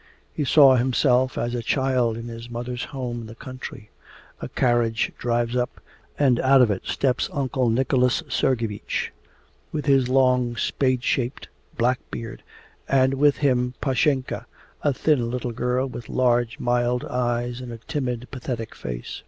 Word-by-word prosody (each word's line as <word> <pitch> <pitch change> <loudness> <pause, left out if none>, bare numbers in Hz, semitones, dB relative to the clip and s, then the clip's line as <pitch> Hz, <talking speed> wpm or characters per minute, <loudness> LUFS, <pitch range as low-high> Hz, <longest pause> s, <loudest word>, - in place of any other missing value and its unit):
He 150 - -1
saw 135 -2 +7
himself 130 +1 +2
as 120 - -1
a 120 - -2
child 125 -2 +1
in 115 +1 -7
his 115 0 -8
mother's 120 +1 -4
home 125 -3 -5
in 115 - -8
the 110 - -10
country. 130 -4 -9 0.5
A - - -5
carriage 120 -2 +1
drives 120 0 0
up, 125 0 -1 0.4
and 130 -4 +3
out 130 0 +6
of 110 - +3
it 95 - -4
steps 130 -2 0
Uncle 130 -3 0
Nicholas 125 +1 +2
Sergeevich, 115 -5 -1 0.6
with 150 -2 -3
his 135 -3 +3
long, 125 -2 +3
spade 130 +1 0
shaped, 125 +1 -1 0.3
black 125 +2 +2
beard, 115 -1 -7 0.5
and 130 -1 +3
with 145 +1 +3
him 125 -2 +1
Pashenka, 135 -1 0 0.3
a 145 - +2
thin 130 -3 +1
little 125 0 -3
girl 125 +3 0
with 120 -3 -8
large 120 -2 +1
mild 120 0 +1
eyes 120 0 -1
and 125 -1 -7
a 115 - -6
timid 125 -1 -3
pathetic 120 -4 -5
face. - - -6
125 Hz, 155 wpm, -24 LUFS, 120-130 Hz, 0.6 s, saw